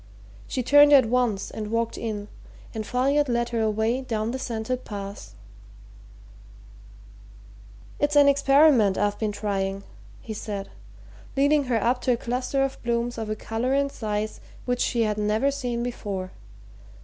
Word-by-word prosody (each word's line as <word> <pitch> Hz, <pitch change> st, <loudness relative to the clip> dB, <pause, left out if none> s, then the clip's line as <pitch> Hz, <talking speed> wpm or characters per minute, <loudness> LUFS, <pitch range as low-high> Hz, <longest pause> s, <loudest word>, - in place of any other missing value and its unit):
She 255 Hz, -, -2 dB
turned 290 Hz, +3 st, +7 dB
at 265 Hz, -4 st, +7 dB
once 230 Hz, -4 st, 0 dB
and 215 Hz, -1 st, -5 dB
walked 230 Hz, 0 st, -1 dB
in, 210 Hz, -3 st, -4 dB, 0.5 s
and 215 Hz, -2 st, -5 dB
Folliot 275 Hz, +3 st, +1 dB
led 240 Hz, 0 st, 0 dB
her 230 Hz, -1 st, -1 dB
away 220 Hz, +3 st, 0 dB
down 225 Hz, -3 st, -2 dB
the 260 Hz, -, -4 dB
scented 245 Hz, +1 st, -3 dB
paths. 200 Hz, -, -8 dB, 2.6 s
"It's 290 Hz, 0 st, +1 dB
an 285 Hz, -1 st, +7 dB
experiment 275 Hz, -7 st, +5 dB
I've 205 Hz, 0 st, 0 dB
been 215 Hz, -2 st, -1 dB
trying," 195 Hz, -1 st, -2 dB, 0.4 s
he 220 Hz, -, -7 dB
said, 205 Hz, -2 st, -6 dB, 0.7 s
leading 285 Hz, +1 st, +3 dB
her 245 Hz, -2 st, +1 dB
up 245 Hz, +4 st, +1 dB
to 250 Hz, -, +2 dB
a -, -, -1 dB
cluster 250 Hz, +3 st, -1 dB
of 270 Hz, 0 st, -3 dB
blooms 235 Hz, 0 st, -1 dB
of 220 Hz, -1 st, -4 dB
a 215 Hz, -, -1 dB
colour 230 Hz, +5 st, -2 dB
and 280 Hz, 0 st, +1 dB
size 215 Hz, -2 st, -3 dB, 0.2 s
which 245 Hz, 0 st, -1 dB
she 235 Hz, -2 st, +1 dB
had 210 Hz, -1 st, -1 dB
never 215 Hz, +6 st, +1 dB
seen 245 Hz, -4 st, -3 dB
before. 200 Hz, -6 st, -4 dB
235 Hz, 150 wpm, -25 LUFS, 215-260 Hz, 2.6 s, turned